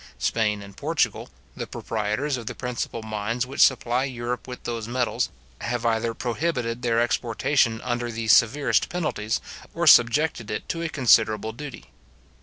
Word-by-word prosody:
Spain 105 - 0
and 100 0 -12
Portugal, - - -1 0.3
the - - -5
proprietors 110 +6 -2
of 120 -3 -7
the - - -4
principal 120 -2 -4
mines 110 +3 -2
which 135 +2 -2
supply 125 -1 +4
Europe 125 -2 -4
with 125 -1 -8
those 115 -2 -4
metals, 125 0 0 0.3
have 120 0 -3
either 115 0 +1
prohibited 125 -2 -2
their 115 -2 +1
exportation 120 0 +1
under 120 -1 -2
the 110 0 -4
severest 120 +6 +4
penalties, 155 - -1 0.4
or - - 0
subjected 120 -1 +5
it 105 - -4
to 165 - -3
a 170 - -2
considerable 110 -6 +3
duty. 140 +4 -9
120 Hz, 150 wpm, -25 LUFS, 110-125 Hz, 0.4 s, subjected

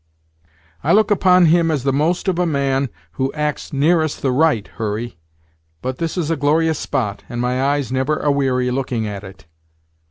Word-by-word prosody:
"I - - +3
look 215 +1 +4
upon 185 -3 +5
him 165 +1 +4
as 150 -5 -1
the 135 -1 +1
most 160 +7 0
of 180 -2 +1
a 180 - +2
man 140 -3 0 0.2
who 135 0 -2
acts 150 -1 -3
nearest 155 +2 +1
the 135 - +2
right, 130 -6 +2
Hurry. 110 -2 -5 0.6
But 130 0 -3
this 165 +2 -3
is 165 -2 -1
a - - +2
glorious 155 +2 +1
spot, 105 -5 -2
and 120 - -5
my 125 +1 0
eyes 140 -1 0
never 130 +4 0
a 145 - +1
weary 130 -3 +1
looking 125 -3 -2
at 100 -1 -5
it!" 95 -1 -12
140 Hz, 185 wpm, -19 LUFS, 125-160 Hz, 0.6 s, upon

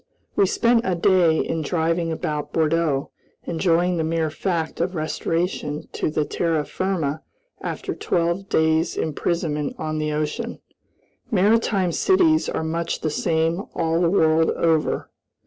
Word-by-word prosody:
We 195 - +4
spent 235 +4 +3
a 185 - 0
day 175 -2 +4
in 165 - -1
driving 165 +1 0
about 150 -2 -3
Bordeaux, 160 -3 +1 0.3
enjoying 175 +1 +1
the 160 - 0
mere 160 -1 0
fact 165 -1 -2
of 180 +2 -1
restoration 155 -1 -2
to - - -1 0.2
terra 160 -3 0
firma 160 -6 -2 0.4
after - - -4
twelve 170 +3 -1
days' 160 +1 +2
imprisonment 155 -1 -1
on 155 0 -3
the 155 0 -1
ocean. 150 0 -3 0.7
Maritime 205 -3 +2
cities 330 - +3
are - - -2
much 165 +1 -2
the 155 - -1
same 165 +3 0
all 165 0 +1
the 170 - +3
world 160 -3 +3
over. 160 -2 0
165 Hz, 130 wpm, -23 LUFS, 160-180 Hz, 0.7 s, We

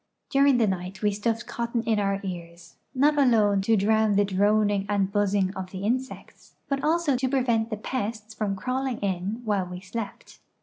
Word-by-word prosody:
During 275 -1 +4
the 235 - +3
night 190 0 -4
we 210 - +3
stuffed 225 +3 -2
cotton 235 0 -2
in 225 -2 +1
our 195 -1 0
ears, 170 -2 -8 0.2
not 295 +3 +3
alone 215 -7 +4
to 220 +3 +2
drown 215 +1 +2
the 205 0 +4
droning 205 +1 +2
and 200 -2 +1
buzzing 200 -1 +1
of 190 -1 -5
the 190 +1 -7
insects, 255 +5 -4
but 275 -1 -2
also 315 -2 +2
to 260 +1 0
prevent 240 -4 +1
the 215 - -3
pests 220 -1 -4
from 210 -2 -2
crawl 255 +7 -2
ing 250 -3 -2
in 200 +3 -2
while 200 -4 0
we 180 0 -7
slept. 205 +3 -7
210 Hz, 185 wpm, -26 LUFS, 195-235 Hz, 0.2 s, During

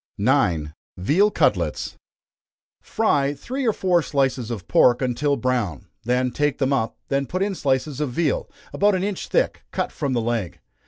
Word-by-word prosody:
9. 90 - +1 0.2
Veal 155 - +3
Cutlets. - - 0 0.9
Fry 145 -10 +1
three 255 - -3
or - - +5
four 180 -4 +2
slices 135 -5 0
of 105 -8 -5
pork 120 -1 +5
until 130 +3 0
brown 115 - -1 0.5
take 145 0 0
them 135 0 +1
up, 115 -5 -1
then 140 -1 0
put 185 +1 -1
in 200 0 -1
slices 140 -2 -1
of 150 - 0
veal, 150 +1 0 0.2
about 205 0 +3
an 185 - -1
inch 200 -2 -3
thick, - - 0
cut - - -2
from 140 -2 -2
the 120 - +1
leg. 115 -6 -2
140 Hz, 160 wpm, -23 LUFS, 120-170 Hz, 0.9 s, or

